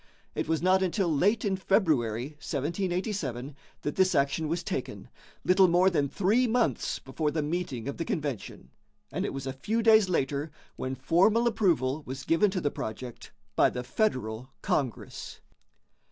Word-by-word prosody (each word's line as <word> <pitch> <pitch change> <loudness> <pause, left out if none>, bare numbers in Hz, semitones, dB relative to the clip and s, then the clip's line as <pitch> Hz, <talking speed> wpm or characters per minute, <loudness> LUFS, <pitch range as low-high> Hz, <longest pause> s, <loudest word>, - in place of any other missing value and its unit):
It - - -2
was 160 +1 0
not 185 +1 +4
until 185 -2 +1
late 205 +10 +2
in 195 -2 +1
February, 145 - +1
1787, 160 - -2 0.3
that 145 - -2
this 190 0 +3
action 140 +3 +1
was 170 +3 -2
taken, 130 - -4 0.4
little 185 +1 +6
more 180 +2 +4
than 145 -5 +1
three 215 - +2
months 230 - +1
before 150 +3 -2
the 155 0 -1
meeting 145 -7 -3
of 140 - -4
the 165 - -1
convention, 135 - -4 0.4
and - - -2
it - - -1
was 135 -1 -5
a 135 - -3
few 220 +13 -1
days 220 -3 +6
later 145 -2 0 0.3
when 130 +1 -3
formal 195 - +3
approval 165 - +1
was 130 +1 -6
given 165 +6 +3
to 185 -1 -2
the 145 - 0
project 120 +2 -7 0.2
by - - +5
the 125 - -5
Federal 125 - -1
Congress. 130 -8 -3
160 Hz, 160 wpm, -28 LUFS, 135-190 Hz, 0.4 s, little